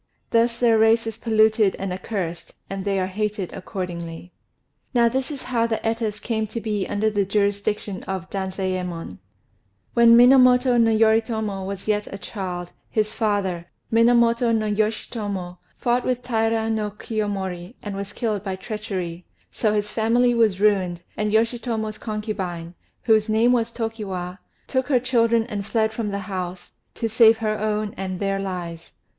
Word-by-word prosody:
Thus 235 0 +2
their 230 -2 +4
race 225 +1 +4
is 225 0 -5
polluted 220 -2 +3
and 195 -1 -4
accursed, 180 -3 -5 0.2
and 195 -1 -3
they 195 -1 0
are 185 - +1
hated 205 0 -3
accordingly. 175 -3 -6 0.6
Now 235 -1 +5
this 260 +3 -1
is 285 -3 -6
how 235 -2 +1
the 225 -1 -1
Etas 225 -2 -1
came 220 -2 -2
to 220 +2 -5
be 210 -3 -2
under 215 +1 0
the 205 -1 +1
jurisdiction 200 0 -1
of 190 -2 -4
Danzayémon: 185 - -3 0.7
When 235 0 +7
Minamoto 250 0 +6
no 225 - +4
Yoritomo 220 -2 +2
was 195 0 -6
yet 210 -1 0
a 195 - -5
child, 180 -3 -5 0.2
his 215 0 0
father, 195 -6 -1 0.2
Minamoto 235 +1 +4
no 220 -1 +1
Yoshitomo, 205 -3 -2 0.2
fought 245 0 +1
with 250 -1 -1
Taira 225 -2 +1
no 215 -1 -1
Kiyomori, 200 -2 -4
and 205 -2 -5
was 200 0 -5
killed 210 -2 -2
by 190 -2 -3
treachery: 185 -4 -5 0.2
so 215 - +1
his 210 0 -1
family 240 +3 +3
was 220 -5 +2
ruined; 185 -5 +2
and 210 0 -1
Yoshitomo's 225 -1 0
concubine, 195 -6 -4 0.3
whose 220 -1 +3
name 225 +3 +4
was 235 -2 +1
Tokiwa, 195 -6 -4 0.3
took 260 -1 -1
her 265 -4 +3
children 230 -2 +2
and 210 -4 -4
fled 220 +1 0
from 225 -3 -2
the 200 - -2
house, 185 -2 -5 0.2
to 230 - -1
save 225 0 +6
her 215 -1 -1
own 215 0 -1
and 185 -1 -4
their 195 -1 0
lives. 175 -4 -5
215 Hz, 155 wpm, -23 LUFS, 190-230 Hz, 0.7 s, When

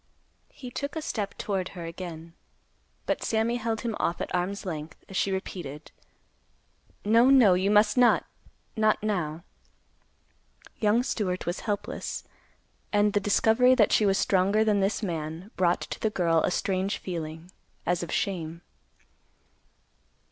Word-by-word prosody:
He 250 -2 -10
took 280 +3 -4
a 320 - -2
step 205 -7 -3
toward 190 -3 -2
her 170 - -5
again, 165 -1 -8 0.7
but - - -1
Sammy 225 +2 +1
held 225 -1 -2
him 230 -3 -2
off 170 - 0
at - - -4
arm's 185 +3 -2
length, 155 -3 -5
as 195 - -10
she 195 - +1
repeated, 165 -6 -5 1.1
"No—no—you 220 -4 +5
must 210 +2 +4
not; 245 -1 +5 0.5
not 215 -1 +2
now." 170 -6 -2 1.4
Young 215 +3 +3
Stewart 190 -8 -2
was 175 - -2
helpless. 205 - -3 0.7
And 205 0 +3
the 205 - +3
discovery 225 +5 +4
that 220 -5 +4
she 210 - +4
was 195 0 +3
stronger 200 +3 +3
than 210 -2 +2
this 195 +3 0
man 165 +2 -4
brought 175 -1 +2
to - - -6
the 220 - +1
girl 170 -5 +2
a - - +1
strange 190 +2 -1
feeling, 165 -1 -6 0.3
as 175 0 +1
of 170 - -5
shame. 170 -3 -2
195 Hz, 140 wpm, -27 LUFS, 175-215 Hz, 1.4 s, No—no—you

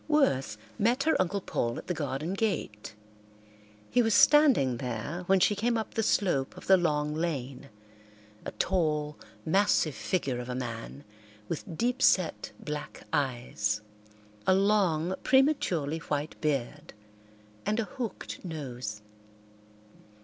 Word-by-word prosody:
Worth 135 - +2 0.2
met 240 +6 +2
her 320 - +3
Uncle 195 +2 -1
Paul 120 -8 -2
at - - -7
the 180 - -1
garden 150 +2 -3
gate. 185 - -2 1.0
He 245 - +4
was 225 -2 +2
standing 265 - +5
there 125 +7 -4
when 195 0 +4
she 205 - +3
came 230 +3 +1
up 220 - -4
the 225 - 0
slope 175 -11 +1
of - - -10
the 190 - +7
long 150 -4 0
lane, 140 -5 -3 0.7
a - - -4
tall, 150 -5 0 0.3
massive 165 -3 +3
figure 130 - -2
of 125 0 -6
a 125 - -3
man, 120 +2 -6 0.4
with 165 +1 -5
deep 250 +2 0
set 180 -9 +2
black 150 -1 -6
eyes, 120 -6 -1 0.7
a 185 - +6
long, 190 -4 +2
prematurely 190 - +2
white 150 -1 -3
beard, 140 -6 -2 0.7
and 215 +2 0
a - - +1
hooked 230 -1 -6
nose. 125 - -6
160 Hz, 130 wpm, -29 LUFS, 135-205 Hz, 1.0 s, the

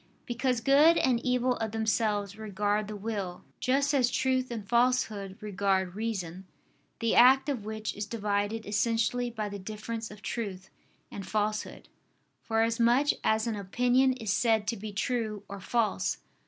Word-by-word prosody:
Because 245 0 -1
good 290 +7 +6
and 245 -3 +2
evil 250 0 +1
of 220 -1 -3
themselves 210 -2 0
regard 210 0 -1
the 215 - -6
will; 200 -4 -4 0.2
just 275 +3 +1
as 255 -4 +3
truth 260 0 0
and 220 -4 -6
falsehood 220 -4 +1
regard 195 -3 0
reason; 190 -4 -4 0.5
the 230 -1 +1
act 265 +3 +6
of 245 -7 -3
which 215 0 -4
is 205 0 -4
divided 210 0 -2
essentially 230 +3 0
by 220 -3 -4
the 200 0 -6
difference 215 +3 -5
of 210 0 -13
truth 190 -5 -5 0.4
and 200 - -6
falsehood, 215 0 -2 0.5
for 225 0 +1
as 230 +1 0
much 245 +5 +4
as 220 +1 +2
an 230 -2 -1
opinion 245 +6 +2
is 220 -6 -2
said 220 -1 +2
to 235 - -1
be 210 +1 -7
true 215 0 -2
or 200 0 -7
false. 230 +2 0
220 Hz, 155 wpm, -29 LUFS, 205-245 Hz, 0.5 s, good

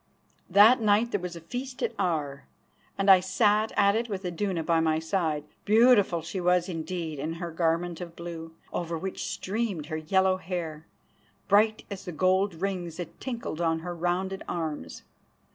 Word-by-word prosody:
That 210 +6 +7
night 215 +2 +3
there 205 - 0
was 180 -1 -6
a 170 - -9
feast 250 +9 -6
at - - 0
Aar, 150 -7 -2 0.5
and 195 - 0
I 190 -1 +9
sat 210 +3 +2
at 200 0 +4
it 235 +1 -1
with 195 -2 -4
Iduna 180 -1 -2
by 165 0 +2
my 160 -1 +2
side. 160 -2 -1 0.2
Beautiful 210 -6 +4
she 185 +3 -4
was 180 0 +2
indeed 165 -3 -4
in 155 +4 -3
her 170 0 -5
garment 165 +1 0
of 170 -1 -7
blue, 165 -1 -8 0.2
over 170 -1 -2
which 190 +3 -4
streamed 200 -6 -3
her 155 0 -4
yellow 190 +4 +2
hair, 165 -4 -5 0.6
bright 215 +2 +3
as 195 -1 -6
the 180 - -4
gold 185 +2 +2
rings 175 -2 -3
that 175 -3 -7
tinkled 235 -10 -4
on 165 -1 +1
her 175 +1 -5
rounded 180 +3 -1
arms. 155 - -4
180 Hz, 170 wpm, -27 LUFS, 165-200 Hz, 0.6 s, I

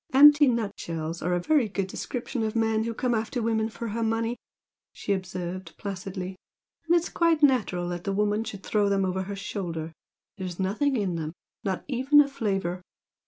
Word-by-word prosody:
"Empty 295 +2 +8
nutshells 170 -8 -2
are 180 +2 0
a - - +1
very 255 - +2
good 195 -1 -1
description 245 +5 -4
of 220 0 -1
men 220 -1 +2
who 230 - -2
come 250 +1 0
after 225 +3 -1
a - - -2
woman 220 -1 +1
for 230 +1 -5
her 230 +3 -2
money" 225 +1 0 0.6
she 200 - -2
observed, 185 -1 -5
placidly 190 -1 -5 0.5
"and 340 - +5
it's 340 0 +2
quite 330 -3 +2
natural 210 -10 +3
that 175 0 -4
the 195 - -1
woman 210 +2 +1
should 200 -3 -7
throw 205 -1 +2
them 195 -1 +2
over 190 0 -1
her 200 +1 -4
shoulder. 170 -5 -4 0.5
There's 185 -2 -5
nothing 225 +9 +1
in 190 -5 -1
them 155 -1 -4 0.3
not 190 -4 -2
even 270 +2 +4
a 290 - +6
flavour! 195 -9 -2
205 Hz, 185 wpm, -27 LUFS, 185-235 Hz, 0.6 s, Empty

